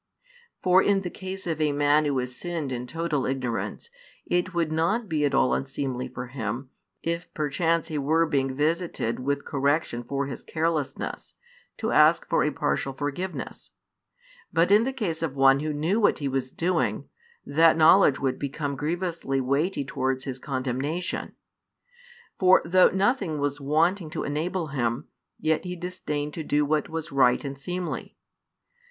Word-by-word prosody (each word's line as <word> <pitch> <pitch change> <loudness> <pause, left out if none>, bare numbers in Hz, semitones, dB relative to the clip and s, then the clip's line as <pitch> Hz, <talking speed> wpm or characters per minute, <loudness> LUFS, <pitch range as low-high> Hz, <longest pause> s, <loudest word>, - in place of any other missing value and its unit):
For 185 +1 +6
in 200 -1 +2
the 180 -2 -5
case 190 0 -7
of 160 -2 -2
a 150 -1 +3
man 145 +1 +3
who 140 -2 0
has 125 0 -3
sinned 165 -5 -4
in 125 0 -4
total 165 -3 -1
ignorance, 130 - -3 0.3
it 175 +1 0
would 170 -3 0
not 175 +9 +1
be 155 -4 +1
at 145 - +1
all 65 0 +3
unseemly 125 - -2
for 125 - -6
him, 125 +1 -5 0.3
if 170 +1 -3
perchance 165 +2 0
he 155 -2 -2
were 160 +4 +3
being 135 -4 0
visited 155 -5 -1
with 140 +2 -2
correction 140 -3 0
for 140 +3 -2
his 135 -2 -7
carelessness, 160 -3 -3 0.4
to - - -2
ask - - +5
for - - +2
a - - +2
partial 135 - -1
forgiveness: 145 +7 -5 0.8
but 170 +3 +3
in 210 +3 +6
the 265 - 0
case 200 -12 -3
of 155 -4 -2
one 135 0 +5
who 155 +1 -2
knew 160 +9 0
what 210 - +3
he 145 - -2
was 130 -1 -1
doing, 175 +7 -1 0.4
that 160 +2 +4
knowledge 160 -2 +6
would 135 -2 -1
become 140 0 -3
grievously 165 -2 -2
weighty 140 +5 0
towards 130 0 -1
his 130 -1 -5
condemnation. 135 +6 -3 1.1
For 185 -1 +6
though 185 +2 +5
nothing 195 - +1
was 145 0 -2
wanting 160 +5 +1
to 160 - -4
enable 160 +3 -2
him, 120 -1 -2 0.3
yet 155 0 +1
he 180 -1 -4
disdained 150 -4 -4
to 160 - -4
do 150 0 +1
what 150 0 0
was 160 0 -5
right 130 0 +3
and 140 0 -4
seemly. 175 +6 -5
150 Hz, 160 wpm, -26 LUFS, 135-170 Hz, 1.1 s, For